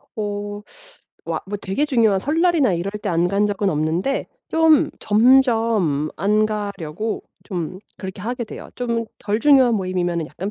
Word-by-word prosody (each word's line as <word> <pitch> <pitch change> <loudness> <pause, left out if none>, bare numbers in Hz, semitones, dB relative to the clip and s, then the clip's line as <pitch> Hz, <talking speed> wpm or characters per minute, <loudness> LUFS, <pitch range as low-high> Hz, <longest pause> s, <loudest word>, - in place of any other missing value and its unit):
어 205 -1 -4 0.6
뭐 - - -2
아 - - -3 0.2
되게 195 +11 -1
중요한 230 -9 +2
설날이나 315 - +2
이럴 175 +3 -2
때 - - -2
안 170 +1 +2
간 200 +2 +2
적은 205 -1 0
없는데 165 - -1 0.2
좀 320 -2 +4
점점 225 - +3
안 210 +4 +2
가려고 205 -2 -4 0.2
좀 180 -2 -4 0.2
그렇게 190 -1 -7
하게 240 +2 -3
돼요. 215 - -10
좀 235 -2 -1
덜 210 +2 -1
중요한 265 -3 +5
모임이면 180 -4 -1
약간 185 +7 -6
205 Hz, 275 characters per minute, -21 LUFS, 185-235 Hz, 0.6 s, 중요한